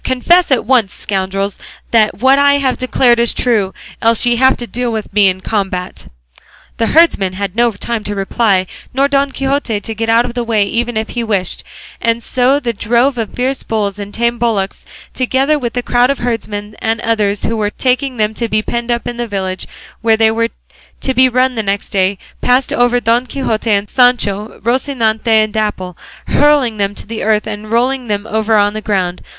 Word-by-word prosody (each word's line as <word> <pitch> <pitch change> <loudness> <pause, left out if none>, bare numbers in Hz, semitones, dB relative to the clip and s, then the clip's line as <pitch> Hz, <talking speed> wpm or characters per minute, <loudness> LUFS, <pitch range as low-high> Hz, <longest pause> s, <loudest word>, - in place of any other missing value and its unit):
Confess 340 +8 +3
at 265 -4 +1
once, 235 -5 +2
scoundrels, 195 0 -3 0.3
that 220 -2 +3
what 265 +3 +4
I 285 0 +5
have 270 -2 +1
declared 245 -1 +2
is 235 0 +2
true; 215 -6 +1 0.3
else 230 +1 +3
ye 240 -1 +2
have 260 +2 +4
to 240 - -5
deal 245 0 -3
with 220 -3 -5
me 205 -1 +5
in 185 0 -1
combat." 190 -3 -3 0.7
The 225 - +1
herdsman 220 - +3
had 195 0 -4
no 235 0 +3
time 225 +2 -4
to 205 - -3
reply, 195 -1 +1 0.3
nor 275 +1 +3
Don 280 0 +1
Quixote 270 -5 -1
to 225 - -6
get 225 +1 -3
out 230 +1 +4
of 245 - -5
the 240 -1 -2
way 220 -3 +1
even 235 +3 -2
if 220 0 -2
he 240 - -3
wished; 200 -5 -1 0.4
and 230 0 0
so 255 +3 +2
the 240 -4 -2
drove 240 +4 +1
of 220 -3 -4
fierce 260 +2 -1
bulls 205 -2 -2
and 205 0 -6
tame 235 +2 -1
bullocks, 215 -5 -2 0.3
together 265 +4 +1
with 240 -3 -3
the 245 - -2
crowd 245 +1 +2
of 280 - 0
herdsmen 215 -3 -4
and 225 0 -1
others 210 -3 0
who 230 - -1
were 210 -2 0
taking 255 +3 -1
them 215 0 0
to 230 0 -3
be 215 0 0
penned 235 +1 -3
up 235 -1 -1
in 240 0 -5
a 240 - -2
village 190 -3 -4 0.3
where 225 -1 +3
they 220 0 +4
were 230 +1 0 0.5
to 265 - 0
be 260 +1 +4
run 255 +1 +2
the 225 - -2
next 200 -1 -3
day, 195 0 +1 0.2
passed 250 +1 +2
over 245 0 +2
Don 240 +2 +1
Quixote 235 -5 -2
and 200 -1 +3
over - - -14
Sancho, 225 -5 +2
Rocinante 235 -3 0
and 215 -1 +3
Dapple, 200 -5 -2 0.3
hurling 290 -7 +2
them 200 -1 +1
all - - -20
to - - -8
the 225 +1 -5
earth 215 0 +1
and 215 0 -6
rolling 250 +2 0
them 205 -1 -2
over 220 0 0
on 205 0 +3
the 215 - -5
ground. 185 -4 -1
230 Hz, 205 wpm, -15 LUFS, 210-250 Hz, 0.7 s, I